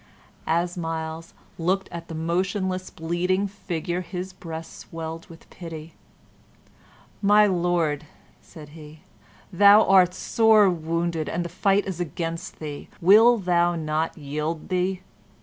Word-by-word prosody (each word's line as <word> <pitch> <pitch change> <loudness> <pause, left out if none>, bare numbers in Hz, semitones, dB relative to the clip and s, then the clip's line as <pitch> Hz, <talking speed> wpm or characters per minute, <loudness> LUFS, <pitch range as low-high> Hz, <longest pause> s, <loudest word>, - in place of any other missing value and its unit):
As 170 +2 0
Myles 165 0 -5 0.2
looked 190 +3 0
at 170 0 -8
the 165 - -7
motionless, 185 +3 -2
bleeding 180 +4 -1
figure, 180 -3 -4
his 185 +1 -6
breast 165 -3 -8
swelled 165 0 -7
with 165 -1 -15
pity. 165 -2 -9 1.3
"My 210 +1 +5
Lord," 170 -6 0 0.3
said 155 -4 -13
he, 155 0 -13 0.5
"thou 205 +4 +7
art 185 -2 +5
sore 220 -3 +4
wounded 165 -1 -2
and 175 +1 -2
the - - -5
fight 195 +3 +1
is 185 -3 -5
against 165 +1 -4
thee; 150 -2 -7
wilt 215 +3 +6
thou 175 -1 +2
not 155 0 -2
yield 150 +3 -4
thee?" 185 0 -1
175 Hz, 125 wpm, -24 LUFS, 160-185 Hz, 1.3 s, thou